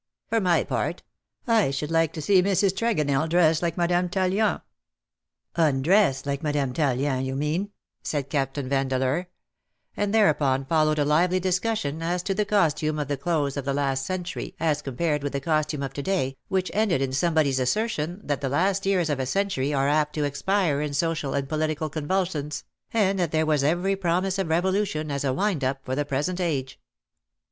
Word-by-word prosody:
" - - -66
For 225 -1 +2
my 180 -3 +3
part, - - -2 0.4
I 225 - +3
should 145 +3 -3
like 165 -1 +2
to 155 - -5
see 190 +3 +5
Mrs. 195 +1 +2
Tregonell 160 -9 0
dressed 165 -2 +3
like 170 -1 -1
Madame 175 +1 +1
Tallien." 190 +3 +1 0.5
" - - -56
Undressed 140 0 +2
like 140 -1 -2
Madame 145 -4 -1
Tallien, 135 -2 0
you 130 0 -3
mean," 155 +8 -1 0.3
said 145 -3 -2
Captain 135 -1 -2
Vandeleur: 135 +4 0 0.7
and 205 -1 -1
thereupon 145 -11 +3
followed 155 +1 +2
a 145 - +2
lively 175 +5 +3
discussion 185 -4 -1
as 175 +2 -1
to 195 - -1
the 210 +2 0
costume 160 -6 +1
of 145 -2 -3
the 145 - +1
close 145 -1 -1
of 140 - -3
the 135 +1 -1
last 135 -2 0
century 180 +3 -4
as 150 -2 +1
compared 150 +3 -1
with 145 0 -3
the 140 - -1
costume 155 -1 -1
of 135 -1 -4
to 140 - -4
day, 140 -7 -1
which 190 -1 -1
ended 210 -8 +2
in 135 -1 -1
somebody's 155 -3 +2
assertion 175 - -1
that 145 -2 -2
the 135 - -1
last 190 +7 +1
years 185 -4 +2
of 145 -3 -1
a 130 - -1
century 190 -6 0
are 135 -1 +1
apt 150 0 +1
to 150 - 0
expire 145 +2 0
in 150 -1 -3
social 160 -3 -1
and 140 -1 -1
political 155 0 -2
convulsions, 155 -1 -2 0.3
and 200 -3 +2
that 170 -4 0
there 160 0 +2
was 150 -3 +2
every 175 +6 +1
promise 190 +1 0
of 190 -4 -1
revolution 175 -2 0
as 140 0 -2
a 135 - +1
wind 180 +1 0
up 130 +1 0
for 130 - -3
the 145 +1 -1
present 150 +6 -2
age. 135 -6 -2
155 Hz, 190 wpm, -25 LUFS, 140-185 Hz, 0.7 s, see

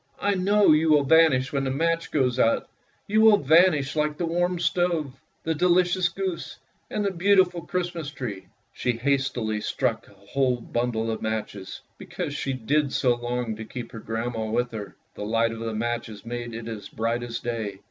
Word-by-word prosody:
I 205 0 +1
know 200 +1 +4
you 155 +1 +4
will 150 -2 +5
vanish 140 -3 +4
when 140 -1 0
the 135 - -1
match 165 +4 0
goes 130 -4 +1
out; 115 - +2 0.4
you 215 +2 +2
will 220 -2 +7
vanish 155 -2 +4
like 150 -1 0
the 175 - -1
warm 175 +2 0
stove, 170 -5 0 0.3
the 160 - 0
delicious 180 +2 +3
goose, 185 -1 -4 0.3
and 210 -1 -2
the 200 - +1
beautiful 185 -1 +3
Christmas 175 -3 -3
tree! 105 - -6
" - - -44
She 125 - -1
hastily 120 -4 -1
struck - - -1
a - - -18
whole 125 +5 -1
bundle 115 -1 -2
of 110 - -4
matches, 110 -3 -4 0.2
because 145 - -5
she 140 -1 -2
did 135 +3 0
so 125 -2 +3
long 120 -1 -3
to 110 - -6
keep 115 +1 -7
her 115 - -8
grandmother 115 0 -3
with 120 +2 0
her. 105 -3 -7 0.2
The - - -7
light 115 +2 +1
of 115 - -7
the 115 -1 -3
matches 115 -1 -3
made 120 0 -5
it 115 0 -6
as 110 -3 -7
bright 115 +2 -1
as 120 -1 -4
day. 110 -5 -4
130 Hz, 190 wpm, -25 LUFS, 115-165 Hz, 0.4 s, will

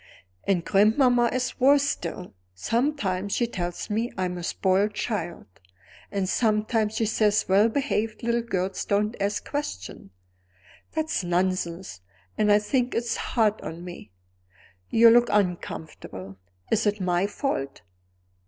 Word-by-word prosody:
And 180 -4 +1
grandmamma 240 +5 +4
is 250 -1 -2
worse 280 +2 +5
still. 190 -9 -4 0.2
Sometimes 200 - -1
she 240 - +2
tells 175 -6 -4
me 225 +3 -1
I'm 180 -1 -1
a - - -7
spoiled 195 +4 +1
child; 175 -7 -3 0.7
and 195 -2 -1
sometimes 215 0 +1
she 225 - +1
says 210 -1 +2
well 200 +4 +4
behaved 225 -4 -1
little 235 0 +1
girls 190 -5 -2
don't 210 +3 0
ask 205 +1 -1
questions. 190 - -5 0.8
That's 315 -8 -1
nonsense 175 - -1 0.3
and 210 -1 +2
I 205 - +7
think 245 +4 0
it's 235 -1 -1
hard 215 -3 0
on 165 +2 -7
me. 175 - -9 0.8
You 230 0 +7
look 240 +1 +5
uncomfortable. 160 - -3 0.3
Is 225 0 +2
it 205 +1 0
my 180 +1 +1
fault? 170 - -3
210 Hz, 130 wpm, -26 LUFS, 185-235 Hz, 0.8 s, I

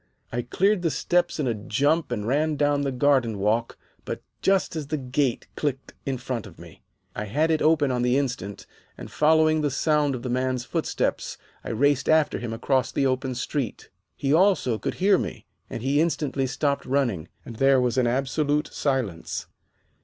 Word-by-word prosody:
I 120 - -1
cleared 190 - +1
the 170 - +1
steps 175 +2 0
in 150 - 0
a 120 - +1
jump 140 +9 0
and 105 -4 -2
ran 150 +5 +1
down 145 0 +2
the 140 -1 -1
garden 130 -4 +2
walk 110 +4 0 0.3
but - - -5 0.2
just 195 -3 +2
as 155 -3 -4
the 155 +1 -1
gate 130 -1 -1
clicked 135 -3 -3
in 135 -1 -1
front 125 -2 -4
of - - -15
me. - - -14 0.3
I 105 - -3
had 150 +10 +1
it 160 - +1
open 155 -3 +3
on 125 -1 0
the 125 +2 +2
instant, 125 -8 -3 0.3
and, - - -9
following 155 0 +3
the 145 - +1
sound 145 0 +1
of 120 - -7
the 130 - -3
man's 130 0 -1
footsteps, - - -2 0.3
I - - -6
raced 140 +4 +2
after 155 -1 +3
him 120 -2 -4
across 130 +3 0
the 140 - 0
open 130 0 0
street. 125 -1 -4 0.2
He, 140 0 0
also, 165 - +3
could - - -3
hear 195 +1 +4
me, - - -5 0.2
and 115 - -6
he 140 +3 +2
instantly 145 -5 0
stopped 140 +2 -1
running, 125 - 0 0.2
and 115 - -9
there 135 +1 +4
was 125 -2 +1
absolute 140 +4 0
silence. 125 - -2
135 Hz, 185 wpm, -25 LUFS, 125-150 Hz, 0.3 s, hear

